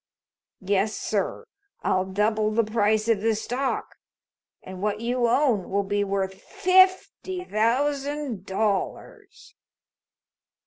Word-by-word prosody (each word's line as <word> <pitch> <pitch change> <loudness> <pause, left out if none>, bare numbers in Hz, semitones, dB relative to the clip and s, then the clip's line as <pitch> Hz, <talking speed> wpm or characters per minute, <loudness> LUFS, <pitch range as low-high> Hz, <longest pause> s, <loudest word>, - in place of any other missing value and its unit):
Yes, 200 +2 +1
sir, 210 - -2 0.4
I'll 185 0 +1
double 215 +2 +1
the 225 +2 +2
price 215 0 +1
of 225 -4 +2
the 225 0 +2
stock, 250 +5 -3 0.7
and 185 0 -9
what 210 0 -1
you 240 +1 0
own 235 -6 +2
will 200 +1 0
be 205 +1 0
worth 195 -1 -2
fifty 370 0 +2
thousand 275 - -1
dollars!" 385 - -3
220 Hz, 105 wpm, -25 LUFS, 200-275 Hz, 0.7 s, the